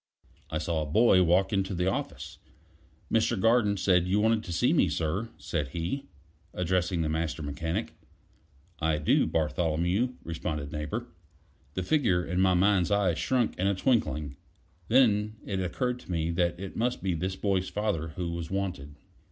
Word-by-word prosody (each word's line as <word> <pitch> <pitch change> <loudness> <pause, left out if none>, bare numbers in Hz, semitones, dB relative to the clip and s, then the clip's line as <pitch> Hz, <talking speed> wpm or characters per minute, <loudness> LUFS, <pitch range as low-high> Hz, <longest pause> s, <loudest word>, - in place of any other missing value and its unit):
I 80 - -2
saw 80 0 -1
a - - -2
boy 95 +3 +5
walk 90 +3 +3
into 95 -1 0
the 90 +1 0
office. 95 - -3 0.7
"Mr. 115 -1 +2
Garten 115 -1 +3
said 90 -2 +3
you 100 +3 +2
wanted 110 -5 +2
me, - - +4
sir," 90 +9 -2
said 75 - -3
he, 85 - -4 0.5
addressing 90 -1 0
the - - -1
Master 80 0 -2
Mechanic. 80 +8 -3 0.9
"I 80 -1 +1
do, 75 - +2
Bartholomew," 85 +8 0
responded 75 -3 -4
Neighbor. 75 +11 -3 0.7
The 95 - -1
figure 95 - +2
in 90 +2 0
my 95 -1 +4
mind's 95 -1 +3
eye 100 -3 +2
shrunk 120 +7 0
in 95 - +2
a 100 - +2
twinkling. 85 - 0 0.5
Then 110 -4 +3
it 95 -2 -2
occurred 125 +7 -1
to 110 - -10
me 85 -1 0
that 85 0 0
it 95 0 -7
must 120 +2 -1
be 95 -2 0
this 95 +3 -2
boy's 95 -1 0
father 105 -7 -1
who 90 -2 -3
was 85 -1 -5
wanted. 90 -8 -3
90 Hz, 160 wpm, -28 LUFS, 80-105 Hz, 0.9 s, boy